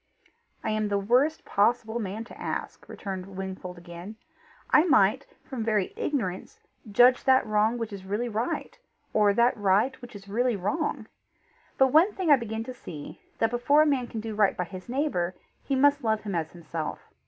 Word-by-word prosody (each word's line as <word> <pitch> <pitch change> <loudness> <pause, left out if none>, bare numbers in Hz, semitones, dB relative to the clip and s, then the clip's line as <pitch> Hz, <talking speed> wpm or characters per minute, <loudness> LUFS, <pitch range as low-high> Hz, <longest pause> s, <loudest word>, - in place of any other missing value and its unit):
"I 220 - -1
am 215 0 0
the 200 -1 0
worst 250 +10 +2
possible 225 +2 +1
man 210 +1 -4
to 230 - -13
ask," - - -5
returned 190 -1 -6
Wingfold 190 -2 -6
again. 175 +4 -9 0.6
"I 300 - +7
might, 260 - +3 0.2
from 255 -5 -5
very 215 -4 0
ignorance, 195 -11 -3 0.3
judge 245 +4 +5
that 260 -1 +5
wrong 215 +2 +2
which 230 -3 -4
is 195 -1 -7
really 205 +5 -2
right, 230 +1 -3 0.3
or 210 -1 +4
that 235 +2 +4
right 210 +5 +1
which 245 -3 -11
is 200 -1 -11
really 240 +3 +1
wrong. 250 - -2 0.7
But 265 -1 +4
one 350 +7 +5
thing 365 -5 0
I - - +10
begin 225 -3 -4
to 255 +2 -7
see, 155 -11 -9 0.2
that 225 0 +1
before 280 +5 +4
a - - +1
man 270 -5 +1
can 225 - -5
do 220 0 -5
right 210 -2 +2
by 180 - 0
his 185 +4 -10
neighbour, 240 - -1 0.3
he 275 - -1
must 285 +1 +3
love 220 -1 +1
him 205 -2 -5
as 165 -2 -1
himself. 165 -2 -5
220 Hz, 185 wpm, -27 LUFS, 195-255 Hz, 0.7 s, I